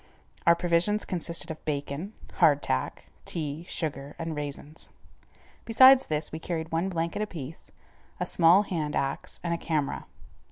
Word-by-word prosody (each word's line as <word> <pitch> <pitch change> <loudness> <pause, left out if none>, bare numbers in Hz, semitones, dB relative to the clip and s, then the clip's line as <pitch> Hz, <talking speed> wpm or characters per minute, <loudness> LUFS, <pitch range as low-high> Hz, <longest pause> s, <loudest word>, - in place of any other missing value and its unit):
Our 170 - +8
provisions 175 +5 +1
consisted 170 -2 -2
of 155 - -9
bacon, 150 +6 -3 0.2
hard 150 -5 +5
tack, 65 - -2 0.2
tea, 155 +1 -4
sugar, 145 -3 -4
and 165 -1 -4
raisins. 145 +1 -7 0.7
Besides 260 +3 +7
this 150 0 -1
we 160 - -5
carried 160 -1 -4
one 165 +4 0
blanket 170 +2 -2
apiece, 165 -8 -7 0.5
a - - 0
small 175 +4 +5
hand 155 -7 -3
axe, 135 0 -3
and 170 -1 0
a 170 - -2
camera. 155 -4 -2
165 Hz, 145 wpm, -28 LUFS, 150-175 Hz, 0.7 s, Our